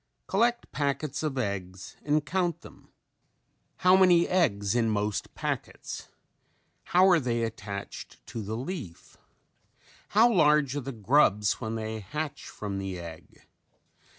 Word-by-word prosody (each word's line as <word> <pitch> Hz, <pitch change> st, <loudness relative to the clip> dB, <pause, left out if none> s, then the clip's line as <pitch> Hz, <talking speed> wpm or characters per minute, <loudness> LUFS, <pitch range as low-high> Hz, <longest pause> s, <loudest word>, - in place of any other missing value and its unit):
Collect 235 Hz, +3 st, +1 dB
packets 140 Hz, 0 st, -2 dB
of 150 Hz, -4 st, -2 dB
eggs 95 Hz, -5 st, -4 dB
and 150 Hz, 0 st, +1 dB
count 175 Hz, -1 st, -1 dB
them. -, -, -15 dB, 0.9 s
How 180 Hz, +1 st, +5 dB
many 180 Hz, -2 st, +5 dB
eggs 105 Hz, -, +1 dB
in 115 Hz, -2 st, +2 dB
most 105 Hz, -1 st, -2 dB
packets? -, -, -4 dB, 0.8 s
How 185 Hz, +2 st, +5 dB
are 180 Hz, -3 st, +6 dB
they 120 Hz, -4 st, -1 dB
attached 105 Hz, -3 st, -6 dB
to 115 Hz, -, -6 dB
the 110 Hz, +2 st, -4 dB
leaf? 130 Hz, -, -7 dB, 0.9 s
How 230 Hz, +3 st, +5 dB
large 150 Hz, -6 st, +4 dB
are -, -, 0 dB
the 135 Hz, +2 st, -5 dB
grubs 105 Hz, -3 st, +2 dB
when 110 Hz, 0 st, -3 dB
they 110 Hz, 0 st, -4 dB
hatch 145 Hz, +8 st, -5 dB
from 100 Hz, -2 st, -5 dB
the 95 Hz, -1 st, -4 dB
egg? 85 Hz, -2 st, -11 dB
130 Hz, 130 wpm, -28 LUFS, 105-165 Hz, 0.9 s, are